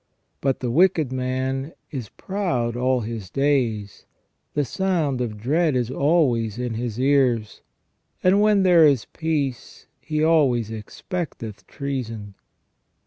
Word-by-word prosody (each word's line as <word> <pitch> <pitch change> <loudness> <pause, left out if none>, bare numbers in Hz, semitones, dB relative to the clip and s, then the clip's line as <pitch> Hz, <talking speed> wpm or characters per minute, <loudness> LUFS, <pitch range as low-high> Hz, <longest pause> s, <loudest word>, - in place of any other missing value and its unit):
But 135 -1 0
"the 125 -2 -1
wicked 165 -2 +3
man 130 +3 -2 0.2
is 125 -9 -5
proud 170 - -2
all 125 0 +1
his 110 -4 -6
days, 120 -7 0 0.5
the 145 -1 +1
sound 160 -5 0
of 110 -4 -3
dread 150 +7 +1
is 125 -1 0
always 130 - +2
in 125 -1 -2
his 115 0 -4
ears: 130 -5 +2 0.6
and 190 +3 +5
when 210 -2 +4
there 175 -4 +7
is 135 -6 +2
peace 150 -6 -3 0.2
he 155 0 -1
always 135 -9 +3
expecteth 115 - -6
treason 115 -7 -5
130 Hz, 125 wpm, -23 LUFS, 115-155 Hz, 0.6 s, there